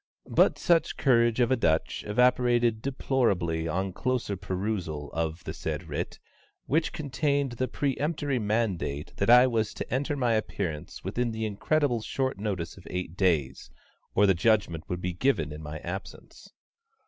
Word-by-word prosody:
But -, -, +4 dB
such 170 Hz, -3 st, +2 dB
courage 120 Hz, -3 st, +3 dB
of 120 Hz, 0 st, +3 dB
a -, -, +5 dB
Dutch 80 Hz, -9 st, 0 dB
evaporated 120 Hz, 0 st, +3 dB
deplorably 100 Hz, -12 st, 0 dB
on 95 Hz, +3 st, -2 dB
closer 125 Hz, -2 st, -1 dB
perusal 90 Hz, -6 st, -3 dB
of 80 Hz, +1 st, -2 dB
the -, -, -5 dB
said -, -, -4 dB
writ, -, -, -4 dB, 0.5 s
which 155 Hz, +3 st, +1 dB
contained 140 Hz, -2 st, -1 dB
the 130 Hz, +2 st, -2 dB
peremptory 145 Hz, +1 st, -1 dB
mandate 105 Hz, -9 st, -1 dB
that -, -, +1 dB
I 125 Hz, +1 st, +9 dB
was 115 Hz, -4 st, 0 dB
to -, -, -5 dB
enter 140 Hz, +3 st, 0 dB
my 120 Hz, -3 st, +2 dB
appearance 80 Hz, -8 st, -3 dB
within 120 Hz, 0 st, -1 dB
the 110 Hz, 0 st, -3 dB
incredibly 120 Hz, +4 st, +1 dB
short 130 Hz, -1 st, -2 dB
notice 100 Hz, -6 st, -3 dB
of 95 Hz, -, -13 dB
eight 90 Hz, -2 st, -4 dB
days, 80 Hz, -9 st, 0 dB, 0.5 s
or 105 Hz, -, +5 dB
the 95 Hz, -, +5 dB
judgment 90 Hz, -4 st, +1 dB
would 90 Hz, 0 st, -3 dB
be 90 Hz, 0 st, -2 dB
given 85 Hz, -, +1 dB
in 75 Hz, +1 st, -7 dB
my 80 Hz, 0 st, -6 dB
absence! 90 Hz, +3 st, -8 dB
110 Hz, 155 wpm, -28 LUFS, 90-130 Hz, 0.5 s, I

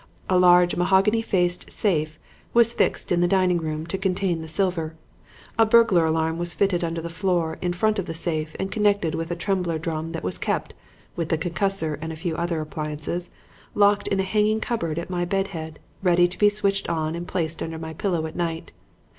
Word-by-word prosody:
A 185 Hz, -, +5 dB
large, 180 Hz, -1 st, +5 dB
mahogany 195 Hz, +5 st, +3 dB
faced 180 Hz, -5 st, +1 dB
safe 155 Hz, -6 st, 0 dB, 0.4 s
was 235 Hz, 0 st, +5 dB
fixed -, -, 0 dB
in 175 Hz, -1 st, +3 dB
the 175 Hz, -, +4 dB
dining 185 Hz, -1 st, +2 dB
room 155 Hz, -1 st, -3 dB
to 190 Hz, +3 st, -3 dB
contain 185 Hz, -3 st, 0 dB
the 160 Hz, -, -7 dB
silver; 165 Hz, -2 st, -1 dB, 0.6 s
a 225 Hz, -, +7 dB
burglar 215 Hz, -8 st, +5 dB
alarm 160 Hz, +1 st, 0 dB
was 175 Hz, 0 st, -1 dB
fitted 185 Hz, -3 st, +1 dB
under 165 Hz, 0 st, -2 dB
the 170 Hz, -, -5 dB
floor 170 Hz, -2 st, -1 dB
in 180 Hz, -, 0 dB
front 215 Hz, +4 st, +1 dB
of 185 Hz, -, -3 dB
the 165 Hz, -, -5 dB
safe 155 Hz, -2 st, -3 dB
and 190 Hz, 0 st, -3 dB
connected 205 Hz, -6 st, +1 dB
with 165 Hz, 0 st, -3 dB
a 175 Hz, -, -2 dB
trembler 180 Hz, -2 st, -1 dB
drum 160 Hz, 0 st, -4 dB
that 165 Hz, -, -5 dB
was 90 Hz, -, -1 dB
kept -, -, -2 dB, 0.4 s
(with 165 Hz, -2 st, -3 dB
the 160 Hz, -, +2 dB
concussor 165 Hz, -2 st, -1 dB
and 160 Hz, 0 st, -4 dB
a -, -, -6 dB
few 165 Hz, 0 st, -3 dB
other 170 Hz, -1 st, -1 dB
appliances) 155 Hz, +3 st, -4 dB, 0.5 s
locked 205 Hz, 0 st, +3 dB
in 195 Hz, -, 0 dB
a -, -, +2 dB
hanging 210 Hz, +3 st, +1 dB
cupboard 170 Hz, -10 st, -2 dB
at 170 Hz, +2 st, -4 dB
my 175 Hz, -1 st, -1 dB
bed 195 Hz, +2 st, -1 dB
head, 160 Hz, -4 st, -7 dB, 0.2 s
ready 175 Hz, -2 st, +4 dB
to 180 Hz, -, -9 dB
be 210 Hz, -, +6 dB
switched 200 Hz, -1 st, 0 dB
on 160 Hz, -1 st, -1 dB
and 170 Hz, +1 st, -5 dB
placed 165 Hz, -2 st, -2 dB
under 165 Hz, 0 st, -4 dB
my 160 Hz, 0 st, -6 dB
pillow 170 Hz, -1 st, -1 dB
at 160 Hz, -, -7 dB
night. 165 Hz, -2 st, -3 dB
175 Hz, 205 wpm, -24 LUFS, 160-195 Hz, 0.6 s, a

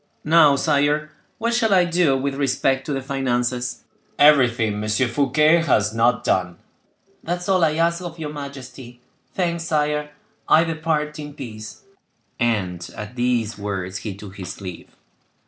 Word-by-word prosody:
"Now, 155 Hz, -2 st, +5 dB
sire, 150 Hz, +1 st, +1 dB, 0.3 s
what 230 Hz, +1 st, -1 dB
shall 225 Hz, -4 st, +3 dB
I 180 Hz, -1 st, +5 dB
do 170 Hz, -5 st, +2 dB
with 140 Hz, +1 st, -2 dB
respect 135 Hz, -1 st, 0 dB
to -, -, -2 dB
the 135 Hz, -2 st, -2 dB
finances?" 125 Hz, -2 st, -2 dB, 0.3 s
"Everything 115 Hz, -8 st, +4 dB
M. 110 Hz, -, -3 dB
Fouquet 140 Hz, +8 st, +3 dB
has 110 Hz, -11 st, +1 dB
not 115 Hz, +1 st, +2 dB
done." 90 Hz, -2 st, 0 dB, 0.7 s
"That 175 Hz, +1 st, -2 dB
is 180 Hz, -, -7 dB
all 185 Hz, -2 st, +3 dB
I 155 Hz, -1 st, +2 dB
ask 170 Hz, +2 st, +1 dB
of 175 Hz, -2 st, -7 dB
your 150 Hz, -2 st, -5 dB
majesty. 130 Hz, -4 st, -9 dB, 0.4 s
Thanks, 170 Hz, -2 st, -1 dB
sire, 150 Hz, -2 st, 0 dB, 0.4 s
I 160 Hz, -, +6 dB
depart 155 Hz, -2 st, -2 dB
in 145 Hz, -1 st, -8 dB
peace;" 110 Hz, -7 st, -9 dB, 0.6 s
and 95 Hz, -8 st, -1 dB
at 105 Hz, +3 st, -7 dB
these 120 Hz, -3 st, 0 dB
words 95 Hz, -2 st, -4 dB
he 95 Hz, +1 st, -6 dB
took 100 Hz, 0 st, -11 dB
his 95 Hz, -1 st, -7 dB
leave. 90 Hz, -4 st, -8 dB
135 Hz, 150 wpm, -22 LUFS, 115-155 Hz, 0.7 s, I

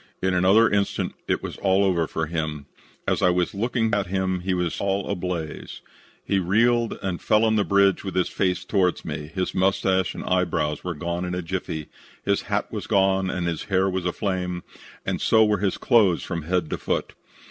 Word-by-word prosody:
"In 95 Hz, 0 st, 0 dB
another 95 Hz, +6 st, +5 dB
instant 100 Hz, -1 st, 0 dB
it -, -, 0 dB
was -, -, -5 dB
all 95 Hz, 0 st, +2 dB
over 85 Hz, -4 st, +2 dB
for 80 Hz, -, -2 dB
him. 80 Hz, -2 st, -3 dB, 0.4 s
As -, -, +1 dB
I 90 Hz, -, +5 dB
was 90 Hz, 0 st, +1 dB
looking 115 Hz, +2 st, 0 dB
at 100 Hz, -2 st, +1 dB
him 95 Hz, 0 st, -1 dB
he 95 Hz, +1 st, -1 dB
was 90 Hz, -2 st, -2 dB
all 100 Hz, 0 st, 0 dB
ablaze. 90 Hz, -5 st, -4 dB, 0.4 s
He 100 Hz, -, +1 dB
reeled 115 Hz, +6 st, +2 dB
and 90 Hz, -3 st, -2 dB
fell 110 Hz, +1 st, +3 dB
on 110 Hz, 0 st, +2 dB
the 105 Hz, -, +3 dB
bridge 100 Hz, -2 st, +3 dB
with 95 Hz, -, -5 dB
his 90 Hz, -1 st, +2 dB
face 90 Hz, -1 st, -1 dB
toward 90 Hz, -2 st, +1 dB
me. 75 Hz, -1 st, -5 dB
His 90 Hz, +1 st, -2 dB
mustache 95 Hz, 0 st, +1 dB
and -, -, -6 dB
eyebrows 85 Hz, -5 st, 0 dB
were 90 Hz, -2 st, -3 dB
gone 85 Hz, +3 st, -3 dB
in 90 Hz, 0 st, -3 dB
a 90 Hz, -, -3 dB
jiffy. 80 Hz, -3 st, -4 dB, 0.4 s
His -, -, +2 dB
hat -, -, 0 dB
had -, -, -4 dB
gone, 95 Hz, -1 st, +2 dB
and 90 Hz, -1 st, -2 dB
his 85 Hz, -2 st, -2 dB
hair 95 Hz, -1 st, +2 dB
was 95 Hz, -1 st, -1 dB
aflame, 90 Hz, -1 st, -2 dB, 0.4 s
and -, -, -2 dB
so 110 Hz, -1 st, +5 dB
were 105 Hz, -2 st, +1 dB
his 95 Hz, -1 st, 0 dB
clothes 105 Hz, -9 st, +3 dB
from 85 Hz, -2 st, -3 dB
head 85 Hz, -2 st, 0 dB
to -, -, -2 dB
foot. -, -, -2 dB
95 Hz, 200 wpm, -24 LUFS, 90-100 Hz, 0.4 s, another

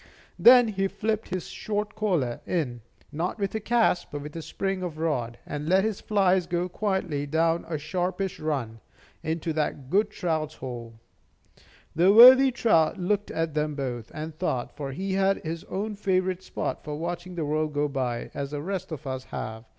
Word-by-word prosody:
Then 245 Hz, -1 st, +8 dB
he 195 Hz, -2 st, 0 dB
flipped 215 Hz, +2 st, -2 dB
his 185 Hz, -2 st, -3 dB
short 210 Hz, 0 st, -3 dB
collar 175 Hz, -, -1 dB
in, 130 Hz, -9 st, -1 dB, 0.3 s
not 165 Hz, +5 st, -2 dB
with 200 Hz, -2 st, -2 dB
a 220 Hz, -, -1 dB
cast, 220 Hz, -5 st, +2 dB
but 145 Hz, +1 st, -6 dB
a 165 Hz, -, -4 dB
spring 195 Hz, +3 st, -3 dB
of 175 Hz, -4 st, -4 dB
the 155 Hz, -, -8 dB
rod, 120 Hz, -8 st, -1 dB
and 150 Hz, +1 st, -4 dB
let 190 Hz, +1 st, +4 dB
his 215 Hz, -2 st, -2 dB
flies 190 Hz, -4 st, +2 dB
go 175 Hz, +1 st, -1 dB
quietly 185 Hz, -7 st, -2 dB
down 165 Hz, +3 st, +1 dB
a 160 Hz, -2 st, -2 dB
sharpish 180 Hz, +5 st, -2 dB
run 130 Hz, -8 st, -3 dB, 0.4 s
into 160 Hz, 0 st, -2 dB
that 145 Hz, -3 st, -2 dB
good 210 Hz, +2 st, +3 dB
trout's 155 Hz, -4 st, -2 dB
hole. 120 Hz, -3 st, -7 dB, 1.0 s
The 175 Hz, +4 st, +5 dB
worthy 255 Hz, +5 st, +10 dB
trout 210 Hz, -10 st, +3 dB
looked 200 Hz, +3 st, 0 dB
at 165 Hz, -1 st, -2 dB
them 150 Hz, -1 st, -1 dB
both, 120 Hz, -5 st, -4 dB
and 155 Hz, +1 st, -6 dB
thought; 130 Hz, -8 st, -2 dB
for 140 Hz, -2 st, -5 dB
he 190 Hz, +7 st, -3 dB
had 195 Hz, 0 st, +2 dB
his 165 Hz, +2 st, -4 dB
own 210 Hz, +3 st, -3 dB
favorite 185 Hz, -2 st, 0 dB
spot -, -, -4 dB
for 150 Hz, -1 st, -5 dB
watching 175 Hz, +3 st, -5 dB
the 165 Hz, -3 st, -2 dB
world 155 Hz, +1 st, 0 dB
go 145 Hz, +1 st, +2 dB
by, 130 Hz, -4 st, -3 dB
as 140 Hz, -1 st, -4 dB
the 145 Hz, 0 st, -4 dB
rest 190 Hz, -1 st, -4 dB
of 155 Hz, -2 st, -6 dB
us 130 Hz, -1 st, -4 dB
have. 110 Hz, +1 st, -6 dB
165 Hz, 180 wpm, -26 LUFS, 150-195 Hz, 1.0 s, worthy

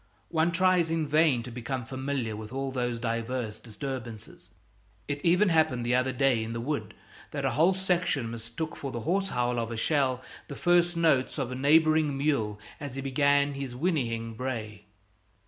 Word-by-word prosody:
One 165 Hz, +1 st, +2 dB
tries 180 Hz, -1 st, +3 dB
in 165 Hz, -2 st, 0 dB
vain 150 Hz, -5 st, +3 dB
to 125 Hz, -, -8 dB
become 125 Hz, +1 st, -4 dB
familiar 130 Hz, -3 st, -3 dB
with 110 Hz, +1 st, -8 dB
all 135 Hz, 0 st, -3 dB
those 120 Hz, -2 st, -2 dB
diverse 115 Hz, -1 st, -2 dB
disturbances. 115 Hz, 0 st, -7 dB, 0.6 s
It 145 Hz, 0 st, -3 dB
even 180 Hz, +4 st, +4 dB
happened 155 Hz, -7 st, +2 dB
the 120 Hz, -, +1 dB
other 125 Hz, +1 st, +2 dB
day 130 Hz, -3 st, +2 dB
in 115 Hz, +1 st, -5 dB
the 115 Hz, -, -3 dB
wood 145 Hz, +5 st, -3 dB, 0.3 s
that -, -, -3 dB
a -, -, +2 dB
whole 170 Hz, +5 st, +3 dB
section 180 Hz, -10 st, 0 dB
mistook 115 Hz, +7 st, -5 dB
for 135 Hz, -, -5 dB
the 120 Hz, -, -4 dB
hoarse 195 Hz, -, +1 dB
howl 125 Hz, 0 st, 0 dB
of 115 Hz, -1 st, -2 dB
a 115 Hz, -, -4 dB
shell 130 Hz, -1 st, +1 dB, 0.2 s
the 140 Hz, -, -7 dB
first 175 Hz, +1 st, +3 dB
notes 155 Hz, -6 st, +2 dB
of 130 Hz, -3 st, -2 dB
a -, -, -3 dB
neighboring 155 Hz, +1 st, +4 dB
mule 115 Hz, -8 st, 0 dB, 0.2 s
as 140 Hz, -3 st, -6 dB
he 135 Hz, -, -3 dB
began 140 Hz, +1 st, +3 dB
his 135 Hz, -3 st, -5 dB
whinnying 120 Hz, -8 st, -1 dB
bray. 110 Hz, -4 st, -5 dB
130 Hz, 180 wpm, -28 LUFS, 120-155 Hz, 0.6 s, even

